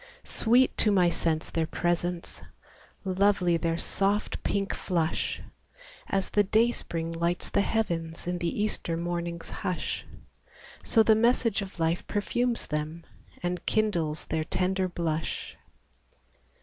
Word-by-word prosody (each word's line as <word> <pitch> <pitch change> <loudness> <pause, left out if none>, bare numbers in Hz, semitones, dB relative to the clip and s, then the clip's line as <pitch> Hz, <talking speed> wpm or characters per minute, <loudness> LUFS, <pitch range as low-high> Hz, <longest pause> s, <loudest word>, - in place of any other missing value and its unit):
Sweet 245 +3 +3
to 215 - +5
my 180 -3 +4
sense 160 -2 0
their 165 -1 0
presence, 175 0 -1 0.6
Lovely 190 -2 +3
their 165 0 0
soft 200 +4 +1
pink 200 -1 -1
flush! 170 -3 -1 0.7
In 195 -1 +2
the 205 +1 +4 1.9
Easter 205 -5 -1
mornings 170 0 -3
hush 180 - -2 0.8
So 225 - +4
the 220 - +6
message 230 -1 +3
of 190 -2 -8
life 165 +1 0
perfumes 240 +3 0
them, 150 +2 -3 0.4
And 180 0 -2
kindles 170 -8 0
their 160 -1 -1
tender 185 +3 0
blush. 165 -3 -3
180 Hz, 100 wpm, -28 LUFS, 170-205 Hz, 1.9 s, the